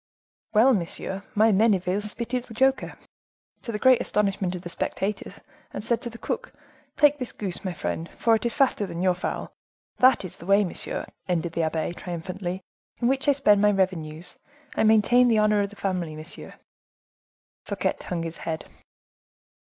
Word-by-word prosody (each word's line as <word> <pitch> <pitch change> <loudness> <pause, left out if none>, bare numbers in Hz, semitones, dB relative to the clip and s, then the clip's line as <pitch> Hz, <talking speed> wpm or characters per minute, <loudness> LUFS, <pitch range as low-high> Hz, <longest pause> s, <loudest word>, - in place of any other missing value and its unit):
"Well, 235 +5 +6
monsieur, 190 0 -2
my 220 +2 +5
Menneville 195 -2 +2
spitted 235 +4 -3
the 225 - -12
joker, 265 +3 +1 0.6
to 235 - -5
the 210 - -2
great 255 +2 +5
astonishment 195 -3 0
of 180 - -7
the 175 - -6
spectators, 200 +4 -3 0.3
and - - -6
said 235 +1 +1
to 240 - -3
the 230 - -11
cook:—'Take 295 +4 -1
this 250 - -3
goose, 195 -1 -5
my 185 -2 -2
friend, 165 0 -4
for 230 - +3
it 225 - +2
is 235 +2 -1
fatter 265 -8 +2
than 170 0 -4
your 185 -1 +4
fowl.' 175 - -4 0.4
That 255 -5 +5
is 180 - -8
the 170 - -12
way, 200 +1 +5
monsieur," 180 - -3 0.2
ended 170 -1 0
the 170 - 0
abbe, 160 +1 -1
triumphantly, 180 +2 -5 0.4
"in 240 - +2
which 270 +2 0
I - - +6
spend 210 -7 +4
my 210 - +5
revenues; 180 -5 -2 0.4
I - - +1
maintain 220 +3 +5
the 230 -2 +3
honor 210 -1 +3
of 200 - -1
the 205 - -14
family, 180 -6 -2
monsieur." 155 +3 -7 1.1
Fouquet - - -1
hung 170 -2 -3
his 165 0 -5
head. 160 -1 -4
200 Hz, 175 wpm, -25 LUFS, 175-230 Hz, 1.1 s, Well